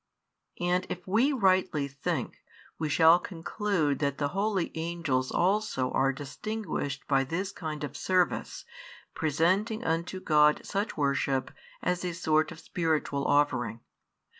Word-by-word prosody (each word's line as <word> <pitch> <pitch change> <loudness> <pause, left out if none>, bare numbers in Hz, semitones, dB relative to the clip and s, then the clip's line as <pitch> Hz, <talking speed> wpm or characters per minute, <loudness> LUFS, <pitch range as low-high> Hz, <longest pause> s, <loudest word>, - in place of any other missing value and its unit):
And 180 +1 0
if 180 0 -5
we 230 +9 +3
rightly 185 - +2
think, 140 0 -4 0.4
we 155 - -1
shall 160 +4 +6
conclude 175 -4 -1
that 140 -1 0
the 145 -1 0
holy 195 +1 0
angels 160 -6 -1
also 180 -9 +1
are 135 0 +2
distinguished 145 +2 -4
by 135 -1 +3
this 180 +8 -3
kind 155 -3 -5
[of 145 -1 -5
service], 180 +2 0 0.5
presenting 185 - +1
unto 170 +2 -1
God 150 -3 +3
such 205 +2 -2
worship 140 -2 0 0.3
as 180 0 0
a 180 -1 -2
sort 155 -2 +1
of - - -10
spiritual 155 -5 -1
offering. 130 -6 +1
160 Hz, 130 wpm, -29 LUFS, 145-185 Hz, 0.5 s, shall